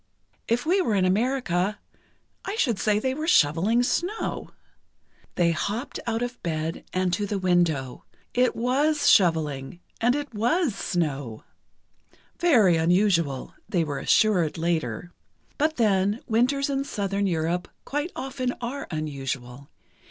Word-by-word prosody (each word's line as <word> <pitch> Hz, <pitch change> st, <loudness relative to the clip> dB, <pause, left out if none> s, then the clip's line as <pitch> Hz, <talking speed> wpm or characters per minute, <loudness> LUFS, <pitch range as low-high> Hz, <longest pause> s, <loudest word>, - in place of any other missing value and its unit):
"If 240 Hz, +4 st, 0 dB
we 370 Hz, +4 st, +3 dB
were 225 Hz, -, 0 dB
in 190 Hz, -2 st, +2 dB
America, 205 Hz, -2 st, 0 dB, 0.7 s
I 395 Hz, -, -4 dB
should 240 Hz, -, +1 dB
say 210 Hz, -1 st, +2 dB
they 260 Hz, +4 st, 0 dB
were 310 Hz, +3 st, -4 dB
shoveling 200 Hz, -, +3 dB
snow." 360 Hz, -, -2 dB, 0.9 s
They 170 Hz, -1 st, +3 dB
hopped 210 Hz, -, -3 dB
out 230 Hz, +1 st, 0 dB
of 245 Hz, 0 st, -5 dB
bed, 160 Hz, 0 st, -3 dB
and 185 Hz, -1 st, 0 dB
to 205 Hz, +3 st, -1 dB
the 205 Hz, -, -2 dB
window. 170 Hz, -8 st, 0 dB, 0.3 s
It 250 Hz, +1 st, +2 dB
was 285 Hz, +5 st, +1 dB
shoveling, 160 Hz, -5 st, +2 dB, 0.2 s
and 245 Hz, +3 st, +3 dB
it 290 Hz, -3 st, -4 dB
was 245 Hz, -, +1 dB
snow. 145 Hz, -, -3 dB, 1.0 s
"Very 225 Hz, -, +5 dB
unusual," 170 Hz, -5 st, +1 dB, 0.2 s
they 175 Hz, -3 st, +1 dB
were 145 Hz, -3 st, -3 dB
assured 180 Hz, -9 st, +2 dB
later. 165 Hz, -2 st, -2 dB, 0.5 s
But 310 Hz, +2 st, +1 dB
then, 205 Hz, -1 st, +2 dB
winters 255 Hz, +5 st, +1 dB
in 275 Hz, -1 st, -1 dB
Southern 200 Hz, -5 st, -2 dB
Europe 170 Hz, +1 st, -1 dB, 0.2 s
quite 295 Hz, +5 st, -2 dB
often 255 Hz, -2 st, -3 dB
are 255 Hz, +4 st, -5 dB
unusual. 135 Hz, -4 st, -5 dB
200 Hz, 130 wpm, -25 LUFS, 165-250 Hz, 1.0 s, Very